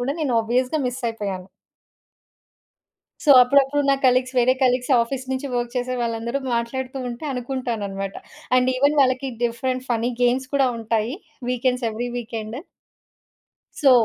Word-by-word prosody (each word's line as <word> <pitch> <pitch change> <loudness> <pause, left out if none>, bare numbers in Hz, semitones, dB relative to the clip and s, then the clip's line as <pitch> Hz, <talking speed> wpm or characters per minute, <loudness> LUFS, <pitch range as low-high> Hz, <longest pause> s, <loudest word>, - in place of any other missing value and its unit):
కూడా 260 +3 -1
నేను 275 -5 0
ఆబ్వియస్‌గా 250 +6 0
మిస్సయిపోయాను. 225 -7 -4 1.8
సో, 295 - +3
అప్పుడప్పుడు 280 +2 +3
నా 275 - +5
కొలీగ్స్, 255 +1 +3
వేరే 250 +1 +5
కొలీగ్స్ 250 +1 +2
ఆఫీస్ 255 +2 -3
నుంచి 260 +2 -3
వర్క్ 240 0 -2
చేసే 250 +1 -1
వాళ్లందరూ 235 +2 -2 0.2
మాట్లాడుతూ 255 +3 -3
ఉంటే 240 +5 -7
అనుకుంటానన్నమాట. 230 -7 -3 0.4
అండ్ 255 0 +3
ఈవెన్ 285 +3 +3
వాళ్లకి 260 0 +2 0.2
డిఫరెంట్ 255 +2 -2
ఫన్నీ 235 +1 +1
గేమ్స్ 255 +1 +2
కూడా 270 -2 +4
ఉంటాయి. 225 +2 -1 0.4
Weekends, 250 -1 0
every 240 +3 -4
weekend. 225 +1 -5 1.2
సో, 275 - +6
250 Hz, 130 wpm, -22 LUFS, 235-260 Hz, 1.8 s, సో